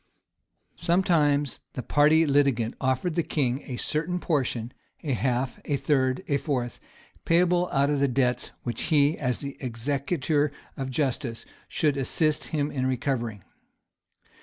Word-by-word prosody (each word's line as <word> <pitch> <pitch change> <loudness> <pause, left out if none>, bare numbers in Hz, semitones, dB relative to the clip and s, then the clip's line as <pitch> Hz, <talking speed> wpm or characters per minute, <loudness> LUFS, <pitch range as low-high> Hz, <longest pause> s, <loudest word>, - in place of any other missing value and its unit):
[] - - -54 0.2
Sometimes 165 -5 +2
the 125 - -4
party 155 +2 +4
litigant 140 -6 +2
offered 130 +6 0
the 170 - +1
king 140 -4 -1
a 125 -3 -4
certain 165 +7 -1
portion, 125 -8 -1 0.3
a 145 -4 0
half, 125 +1 -1
a 145 - 0
third, 130 -3 +1
a 140 - +2
fourth, 130 -4 -2 0.4
payable 175 +1 +3
out 140 +1 +2
of 145 - +1
the 140 - +3
debts 125 -1 +1
which 120 - -3
he, 150 -1 +3
as 125 -3 -1
the 140 -1 -6
executor 140 +4 0 0.2
of 135 -2 -4
justice, 130 -4 -2 0.2
should 150 -3 +1
assist 150 +3 +1
him 150 -2 -1
in 130 -1 -1
recovering. 120 -6 -2
140 Hz, 140 wpm, -26 LUFS, 130-150 Hz, 0.4 s, party